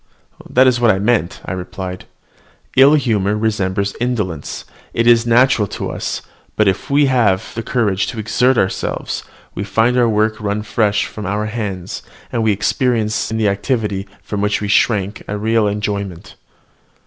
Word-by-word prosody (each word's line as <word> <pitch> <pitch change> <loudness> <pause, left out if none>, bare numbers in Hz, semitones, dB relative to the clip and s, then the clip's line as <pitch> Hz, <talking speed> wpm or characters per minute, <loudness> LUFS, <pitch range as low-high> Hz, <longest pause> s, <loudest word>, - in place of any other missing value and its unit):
"That 130 +1 +5
is 125 -2 +3
what 120 - +5
I 95 - +4
meant," 100 -4 0
I - - -4
replied; 90 0 -6 0.7
"ill 135 +3 +7
humour 105 -7 +1
resembles 100 -2 -1
indolence: 105 - -3 0.3
it 115 - +2
is 120 0 +5
natural 120 -2 +4
to - - -3
us; - - -4 0.3
but 110 - +3
if 95 - +2
once - - -16
we 145 +1 +4
have 115 -4 +1
courage 105 -5 +1
to - - -5
exert 125 +4 +2
ourselves, 95 - -1 0.3
we 100 - -4
find 115 +4 +2
our 120 -1 +4
work 110 0 +1
run 105 0 -2
fresh 105 -1 +1
from 105 -3 -7
our 105 +2 -1
hands, 100 -5 -4 0.3
and 115 - -1
we 110 -1 +3
experience 110 +1 0
in 110 - -2
the 110 -2 +2
activity 100 -2 -1 0.2
from 100 0 -3
which 105 0 +1
we 105 - -3
shrank 105 -1 +1
a 105 - -3
real 110 +1 +2
enjoyment." 100 -3 -3
105 Hz, 165 wpm, -18 LUFS, 100-115 Hz, 0.7 s, ill